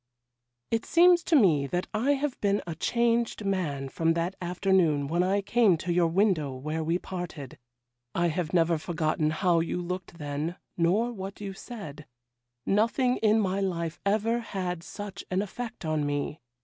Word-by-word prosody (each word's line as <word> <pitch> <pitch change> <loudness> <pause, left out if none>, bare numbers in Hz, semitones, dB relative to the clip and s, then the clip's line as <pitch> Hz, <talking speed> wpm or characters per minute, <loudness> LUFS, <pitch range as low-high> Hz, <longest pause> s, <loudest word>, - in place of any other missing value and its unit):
'It 225 0 +1
seems 345 0 +5
to 330 - +2
me 160 - +4
that 180 +6 -1
I 245 +7 +2
have 280 -1 -2
been 200 0 +1
a 170 - -4
changed 235 +4 0
man 160 -9 -1
from 165 +4 +1
that 170 +3 -1
afternoon 175 -5 +2
when 170 +4 +1
I 195 +2 +2
came 210 -4 +4
to 175 +2 -2
your 170 -1 +3
window 165 -6 +1
where 155 +5 -3
we 165 +2 +1
parted. 175 -8 -7 0.6
I 170 0 +2
have 165 0 -2
never 170 -2 +3
forgotten 155 -2 0
how 170 +2 +2
you 165 +2 -1
looked 180 0 -5
then, 150 +2 -3 0.2
nor 195 +8 +2
what 195 -2 -7
you 200 -1 -5
said; 160 - -9 0.6
nothing 235 +5 +2
in 220 0 +3
my 195 -2 0
life 170 -3 -2
ever 220 +4 +1
had 185 -6 -4
such 205 +3 -7
an 190 +2 +1
effect 235 -1 -7
on 155 -1 0
me. 145 +1 -2
180 Hz, 165 wpm, -28 LUFS, 165-210 Hz, 0.6 s, seems